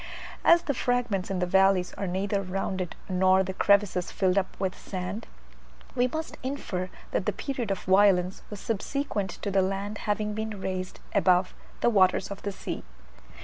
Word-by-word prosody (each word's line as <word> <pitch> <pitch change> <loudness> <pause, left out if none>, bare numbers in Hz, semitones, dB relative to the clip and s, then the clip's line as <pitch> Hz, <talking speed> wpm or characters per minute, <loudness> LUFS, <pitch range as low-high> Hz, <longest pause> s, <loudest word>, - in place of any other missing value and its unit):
As 340 0 +6
the 285 - 0
fragments 245 -7 0
in 195 - -1
the 180 - +1
valleys 190 0 +3
are 195 - -4
neither 195 +2 0
rounded 185 -1 -3
nor 185 0 +4
the 190 0 -4
crevices 200 -2 +2
filled 185 -2 +1
up 195 -2 -1
with 190 -1 -1
sand, 185 +3 -5 0.7
we 245 +1 +2
must 315 +5 -5
infer 205 -9 -3 0.2
that - - -1
the - - +3
period 255 -6 -3
of 195 - -2
violence 190 -1 +4
was 210 - -7
subsequent 225 -2 -2
to 200 - -1
the 195 0 +4
land 195 +2 -2
having 210 0 0
been 220 -1 -4
raised 185 -1 -4
above 185 -2 +3 0.3
the - - +4
waters 190 -1 +3
of 200 - -6
the 200 - -3
sea. 195 - -5
195 Hz, 170 wpm, -27 LUFS, 185-210 Hz, 0.7 s, As